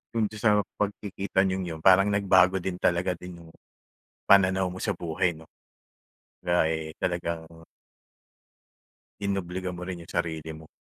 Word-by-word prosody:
Doon 110 -2 +2
din 105 - -8
sa 105 -1 +3 0.2
pagkikita 100 -1 -1
niyong 95 -1 -1
yun, 80 -1 -6
parang 95 +1 +6
nagbago 95 -2 +4
din 90 -1 -3
talaga 90 +1 +1
din 85 -1 -10
yung, 80 - -15 0.8
pananaw 95 -1 +5
mo 90 - -8
sa 105 - -1
buhay 85 +1 -1
'no? 80 - -13 1.0
Kumbaga 90 -1 +2
eh 80 -1 -3
talagang 85 -2 -2 1.8
inobliga 95 -2 -2
mo 90 - -8
rin 90 -2 -5
yung - - -13
sarili 80 -2 -3
mo. 80 0 -12
90 Hz, 145 wpm, -27 LUFS, 85-95 Hz, 1.8 s, parang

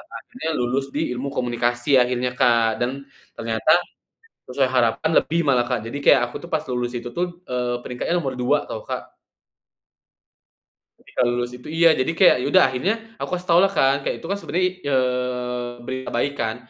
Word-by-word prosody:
akhirnya 250 -9 -7
lulus 125 +2 0
di 155 -2 -1
ilmu 125 +3 -3
komunikasi 120 +1 -1
akhirnya 125 0 +1
Kak 115 -2 +3
dan 130 +3 -2 0.3
ternyata, 115 +6 0 0.8
sesuai 130 +1 +1
harapan 120 +3 +1
lebih 165 +2 +1
malah 125 -3 +3
Kak 125 -1 0
jadi 140 - -4
kayak 130 - +6
aku - - -14
tuh - - -8
pas 155 -1 +1
lulus 125 -1 -2
itu 120 0 -5
tuh, 175 +7 -1 0.3
eee, 120 -1 -2
peringkatnya 125 +7 -2
nomor 135 -5 -4
2 145 +4 +2
tau 110 - -6
Kak. - - -5 1.9
Ketika - - -4
lulus 120 0 0
itu 125 - -12
iya, 165 0 +5
jadi 130 +5 0
kayak 165 - +5
ya - - -1
udah 185 - +7
akhirnya 130 - 0 0.2
aku - - -5
kasih 180 - -14
taulah 180 +3 +5
kan 140 -6 +2
kayak - - -2
itu - - -9
kan 200 - -1
sebenarnya 185 -2 -1
i - - -3
eee, 125 -2 -1 0.2
berita 130 0 -4
baik 140 +4 0
kan, 110 -5 -2
125 Hz, 180 wpm, -22 LUFS, 120-145 Hz, 1.9 s, udah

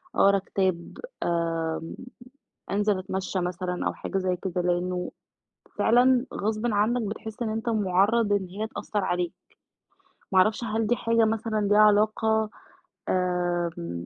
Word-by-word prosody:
أقرا 200 0 +5
كتاب، 185 -3 -2 0.3
آمم 165 -1 -1 0.8
أنزل 205 -1 +1
أتمشى 190 0 -3
مثلًا 180 0 -2
أو - - -1
حاجة 195 - -4
زي 185 -1 0
كده، 180 -1 -3
لإنه 180 +1 -1 0.7
فعلًا 250 +2 +4
غصبٍ 215 +3 -1
عنك 220 +3 +1
بتحس 220 +2 -6
إن 225 - 0
أنت 225 +2 -2
مُعرَّض 205 +1 +2
إن 195 -2 +1
هي 210 +5 -4
تأثّر 205 -2 -3
عليك، 175 -1 -1 1.0
ما 190 - +4
اعرفش 215 +5 +3
هل 220 0 -1
دي 240 - +2
حاجة 230 0 +2
مثلًا 220 0 0
ليها 205 +1 +3
علاقة، 215 +1 +3 0.6
آمم، 175 - -1
200 Hz, 130 wpm, -26 LUFS, 180-220 Hz, 1.0 s, أقرا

